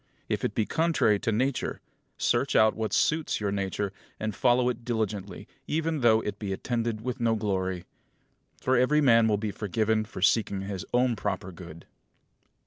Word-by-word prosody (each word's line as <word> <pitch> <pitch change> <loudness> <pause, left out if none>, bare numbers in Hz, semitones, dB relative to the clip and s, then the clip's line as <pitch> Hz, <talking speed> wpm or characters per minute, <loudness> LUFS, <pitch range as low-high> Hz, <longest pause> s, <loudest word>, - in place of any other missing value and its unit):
If - - -2
it - - -1
be 110 - +1
contrary 160 -11 +2
to 115 - -1
Nature, 125 +4 -1 0.4
search - - +1
out 110 0 +5
what 110 -1 -2
suits 155 0 +1
your 100 -2 -1
nature, 100 0 -2 0.3
and 110 0 -2
follow 125 +4 +3
it 125 -1 -2
diligently, 110 -4 -3 0.2
even 160 0 -1
though 110 -2 +5
it 105 -2 -5
be 100 -3 -4
attended 115 +2 -2
with 125 +2 -4
no 115 -1 +2
glory; 95 -4 -2 0.7
for 130 - +1
every 130 +5 +3
man 115 -6 +5
will 105 -2 +2
be 105 0 -3
forgiven 110 +2 0
for 100 -3 -7
seeking 100 -2 +2
his 95 -2 -5
own 125 -1 +2
proper 95 -3 -3
good. 85 -2 -11
110 Hz, 170 wpm, -27 LUFS, 100-120 Hz, 0.7 s, out